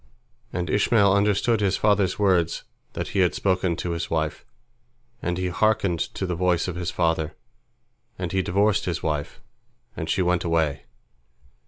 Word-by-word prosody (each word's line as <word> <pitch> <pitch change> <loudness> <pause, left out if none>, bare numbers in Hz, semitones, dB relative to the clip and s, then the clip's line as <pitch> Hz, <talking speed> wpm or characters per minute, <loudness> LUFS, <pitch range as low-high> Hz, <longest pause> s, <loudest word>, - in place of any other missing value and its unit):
And 90 -1 -2
Ishmael 100 +2 +3
understood 105 +3 +2
his 100 -3 +1
father's 100 -3 +2
words 90 -5 +2 0.3
that - - -4
he 100 - -1
had 90 -2 +3
spoken 90 -3 +1
to 85 - -3
his 85 0 -3
wife, 80 -2 -2 0.8
and 90 0 -2
he 90 0 -1
hearkened 100 -3 +1 0.2
to 95 - -2
the 90 - -2
voice 90 0 +1
of 90 - -4
his 90 0 -3
father, 80 -2 0 0.8
and 90 -2 -4
he 95 - +1
divorced 100 +3 +1
his 85 -2 -3
wife, 75 -2 -3 0.5
and - - -5
she 95 - +2
went 90 -1 +1
away. 80 -4 0
90 Hz, 160 wpm, -24 LUFS, 85-100 Hz, 0.8 s, Ishmael